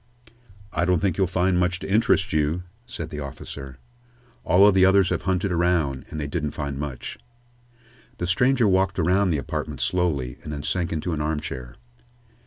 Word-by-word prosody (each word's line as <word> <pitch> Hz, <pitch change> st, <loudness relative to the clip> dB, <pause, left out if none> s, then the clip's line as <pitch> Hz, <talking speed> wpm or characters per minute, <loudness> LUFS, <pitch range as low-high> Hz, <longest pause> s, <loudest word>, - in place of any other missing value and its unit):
"I 85 Hz, -, +1 dB
don't 90 Hz, 0 st, +3 dB
think 95 Hz, -1 st, 0 dB
you'll 95 Hz, -, +3 dB
find 90 Hz, 0 st, +1 dB
much 90 Hz, 0 st, +1 dB
to -, -, -7 dB
interest 105 Hz, -3 st, +2 dB
you," 80 Hz, +3 st, +1 dB, 0.2 s
said 85 Hz, -9 st, -6 dB
the 75 Hz, -, -5 dB
officer. 70 Hz, -1 st, -8 dB, 0.7 s
"All 95 Hz, +3 st, +5 dB
of 105 Hz, -, +5 dB
the 95 Hz, -1 st, +5 dB
others 95 Hz, -1 st, +5 dB
have -, -, 0 dB
hunted 95 Hz, +1 st, 0 dB
around, 85 Hz, -6 st, +1 dB
and 75 Hz, -, -5 dB
they 75 Hz, -, -2 dB
didn't 75 Hz, 0 st, -3 dB
find 70 Hz, -2 st, -3 dB
much." 70 Hz, -4 st, -6 dB, 1.0 s
The 90 Hz, -, -2 dB
stranger 125 Hz, +6 st, +3 dB
walked 95 Hz, -1 st, +2 dB
around 95 Hz, +3 st, +3 dB
the 80 Hz, -, +1 dB
apartment 70 Hz, -, -4 dB
slowly, 75 Hz, -9 st, -1 dB
and 75 Hz, -, -7 dB
then 75 Hz, -1 st, -5 dB
sank 85 Hz, +2 st, -1 dB
into 80 Hz, +2 st, -2 dB
an 75 Hz, -, -2 dB
armchair. 75 Hz, -5 st, -4 dB
85 Hz, 180 wpm, -24 LUFS, 75-95 Hz, 1.0 s, All